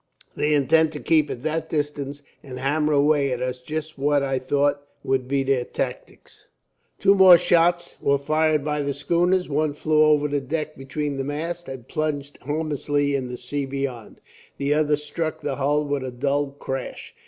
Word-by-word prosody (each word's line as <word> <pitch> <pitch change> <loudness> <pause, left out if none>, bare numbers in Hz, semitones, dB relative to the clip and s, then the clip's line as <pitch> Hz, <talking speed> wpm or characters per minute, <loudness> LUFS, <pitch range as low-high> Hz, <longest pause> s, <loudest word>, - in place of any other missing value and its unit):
They 150 0 +1
intend 155 +3 +3
to 150 - -5
keep 155 -1 +2
at 120 - -6
that 160 +1 -2
distance, 145 -2 -3 0.2
and 130 -2 -9
hammer 150 +4 0
away 145 -1 +3
at 125 - -2
us. 125 0 -3
Just 155 +2 -5
what 145 0 +2
I 135 -1 0
thought 145 +2 +1 0.2
would 130 -1 0
be 135 0 +1
their 135 -2 +1
tactics." - - -6 0.5
Two 195 0 +5
more 190 -3 +8
shots 175 0 +2
were 140 0 +3
fired 155 +1 +1
by 150 -1 -1
the 140 -1 -2
schooners. 175 +5 +1
One 150 0 0
flew 155 +1 +2
over 150 -1 +4
the 145 -1 -1
deck 155 +3 -3
between 140 +1 -4
the 135 - -2
masts, 165 +5 -4
and 130 -3 -8
plunged 145 -2 -3
harmlessly 145 -1 -1
in 135 -2 -1
the 125 - -5
sea 135 +3 -3
beyond. 135 -5 -5 0.4
The 140 +1 +1
other 150 0 +2
struck 150 +2 -4
the 140 -2 -3
hull 145 +2 +1
with 145 -2 -2
a 130 - -4
dull 140 +3 0
crash. 135 -2 -6
145 Hz, 180 wpm, -23 LUFS, 135-155 Hz, 0.5 s, more